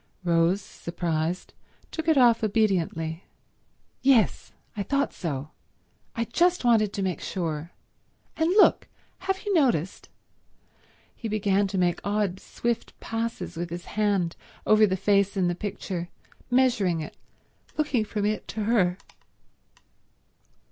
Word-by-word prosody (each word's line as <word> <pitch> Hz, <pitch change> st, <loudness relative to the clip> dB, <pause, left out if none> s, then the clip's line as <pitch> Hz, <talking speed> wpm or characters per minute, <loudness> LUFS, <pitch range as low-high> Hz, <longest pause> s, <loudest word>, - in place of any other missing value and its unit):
Rose, 170 Hz, +3 st, +2 dB
surprised, 170 Hz, -1 st, -3 dB, 0.4 s
took 320 Hz, 0 st, -4 dB
it 320 Hz, -3 st, +4 dB
off 235 Hz, -3 st, +5 dB
obediently. 180 Hz, -6 st, 0 dB, 0.8 s
"Yes—I 240 Hz, -4 st, +1 dB
thought 275 Hz, +8 st, 0 dB
so—I 155 Hz, +8 st, -7 dB
just 345 Hz, +5 st, +2 dB
wanted 220 Hz, -4 st, +4 dB
to 200 Hz, -, -2 dB
make 185 Hz, -5 st, -2 dB
sure. 165 Hz, -3 st, -3 dB, 0.6 s
And 320 Hz, +1 st, +1 dB
look—have 385 Hz, -1 st, +1 dB
you 410 Hz, -, 0 dB
noticed—" 235 Hz, -, +1 dB, 1.1 s
He 230 Hz, -, -5 dB
began 205 Hz, -2 st, +1 dB
to 195 Hz, 0 st, -3 dB
make 175 Hz, -1 st, +1 dB
odd 200 Hz, -2 st, 0 dB
swift 235 Hz, +3 st, -3 dB
passes 225 Hz, -5 st, -4 dB
with 170 Hz, +1 st, -4 dB
his 170 Hz, +1 st, -6 dB
hand 200 Hz, -5 st, +1 dB, 0.3 s
over 215 Hz, 0 st, +6 dB
the 190 Hz, -1 st, 0 dB
face 200 Hz, +1 st, +2 dB
in 185 Hz, -2 st, +2 dB
the -, -, 0 dB
picture, 180 Hz, -2 st, -5 dB, 0.4 s
measuring 235 Hz, -10 st, +2 dB
it, 155 Hz, -, -8 dB, 0.6 s
looking 285 Hz, -7 st, +1 dB
from 210 Hz, -1 st, -2 dB
it 210 Hz, +1 st, -1 dB
to 215 Hz, -, -3 dB
her. 195 Hz, -5 st, +2 dB
205 Hz, 120 wpm, -26 LUFS, 175-230 Hz, 1.1 s, over